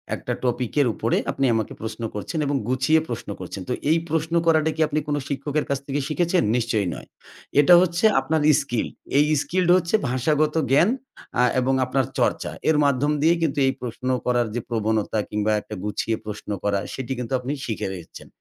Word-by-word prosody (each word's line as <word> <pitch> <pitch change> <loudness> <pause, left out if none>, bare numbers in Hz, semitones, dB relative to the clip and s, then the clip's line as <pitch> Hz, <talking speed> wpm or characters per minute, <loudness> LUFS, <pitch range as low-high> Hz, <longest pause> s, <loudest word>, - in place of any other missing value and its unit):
একটা - - -4
টপিকের 125 +2 +1
উপরে 115 - 0
আপনি 135 - 0
আমাকে 110 -2 -2
প্রশ্ন 110 +1 -5
করছেন 105 - -4
এবং 145 - 0
গুছিয়ে 130 +5 +3
প্রশ্ন 115 -3 -5
করছেন। 95 +1 -7
তো - - +1 0.2
এই 165 - +4
প্রশ্ন 160 +1 -1
করাটা 160 -1 +3
কি 160 - -2
আপনি 150 0 0
কোন 145 - 0
শিক্ষকের 145 +2 -2
কাছ 140 -1 0
থেকে 140 +1 -1
শিখেছেন? 175 +4 +1
নিশ্চয়ই 110 -5 0
নয়। - - -10 0.5
এটা 175 +5 +6
হচ্ছে 175 +2 +1
আপনার 150 +3 0 0.2
স্কিল। 125 -5 -2 0.3
এই 145 - +5 0.2
স্কিল 180 -1 0
হচ্ছে 175 +3 0
ভাষাগত 150 +4 +1 0.2
জ্ঞান, 165 +9 +5 0.5
আ - - +5 0.2
এবং 130 +1 +1
আপনার 130 +1 0
চর্চা। - - 0 0.2
এর 160 - +4
মাধ্যম 140 +1 +2
দিয়েই 165 +3 +4
কিন্তু 145 -2 0
এই 135 - +2
প্রশ্ন 125 +1 -5 0.2
করার 120 -1 +2
যে, 120 - 0
প্রবণতা 110 -1 0
কিংবা 105 +1 0
একটা - - -8
গুছিয়ে 105 +2 -1
প্রশ্ন 105 0 -7
করা, 100 -1 +1
সেটি 130 -1 -5
কিন্তু 125 +1 -4
আপনি 125 +2 -4
শিখে 110 -4 -3
গেছেন। 85 -3 -10
135 Hz, 185 wpm, -23 LUFS, 115-155 Hz, 0.5 s, এটা